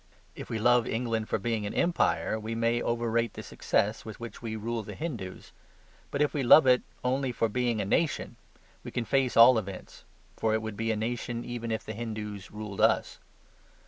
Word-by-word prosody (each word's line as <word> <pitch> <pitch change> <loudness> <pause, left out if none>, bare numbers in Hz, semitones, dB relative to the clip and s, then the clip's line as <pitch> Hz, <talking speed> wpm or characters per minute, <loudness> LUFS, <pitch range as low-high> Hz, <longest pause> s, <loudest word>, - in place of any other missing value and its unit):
If - - -9
we 115 - -2
love 120 +1 +4
England 115 -2 -2
for - - +1
being 110 0 -2
an - - -6
empire, 170 -9 +1
we 110 +1 -4
may 115 +1 +1
overrate 115 0 0
the - - -7
success 105 +2 0
with 110 -1 -9
which 115 -1 -8
we 110 -2 -4
rule 115 +2 -3
the 105 - -8
Hindoos. 120 - -6 0.6
But 140 - +1
if 150 - 0
we 145 - 0
love 135 +4 +8
it 125 -1 +5 0.2
only 130 +1 0
for 115 -1 0
being 120 0 0
a 100 - -1
nation, 155 - 0 0.5
we - - -6
can 120 - -3
face 135 -1 +1
all 115 +1 +8
events: 95 -3 -9 0.3
for 110 -1 +1
it 110 - 0
would 110 -1 -5
be 115 +2 -1
a - - 0
nation 115 +2 -3
even 120 -1 -5
if 110 - -3
the 110 - -5
Hindoos 105 -3 -6
ruled 105 -2 -6
us. - - +2
115 Hz, 200 wpm, -29 LUFS, 110-120 Hz, 0.6 s, love